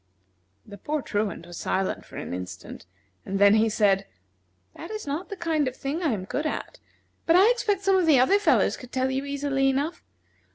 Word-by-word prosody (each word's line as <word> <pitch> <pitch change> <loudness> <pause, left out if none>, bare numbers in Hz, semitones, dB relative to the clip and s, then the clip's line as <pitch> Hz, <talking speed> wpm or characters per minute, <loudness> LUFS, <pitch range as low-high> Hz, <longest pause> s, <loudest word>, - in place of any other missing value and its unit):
The 205 - -12
poor 300 +5 -3
Truant 205 -5 -2
was 175 -1 -10
silent 190 0 -2
for - - -12
an - - -5
instant, 90 0 -8 0.4
and 195 - -3
then 200 +1 +6
he 220 +1 +3
said: 200 -3 +2 0.7
"That 335 - -9
is 430 0 -6
not 295 +5 -4
the 400 - -5
kind 320 -5 0
of 255 - -4
thing 280 +6 -4
I 320 -6 +1
am 195 -4 -3
good 295 +9 -2
at, - - -5 0.5
but 330 - +5
I 395 +6 +6
expect 420 -5 -1
some 390 -1 +4
of 360 -3 +1
the 290 -5 +6
other 385 +11 +4
fellows 410 - +2
could 250 -1 -12
tell 260 0 0
you 265 +1 -2
easily 280 -1 0
enough. 285 +5 -2
275 Hz, 205 wpm, -25 LUFS, 205-330 Hz, 0.7 s, then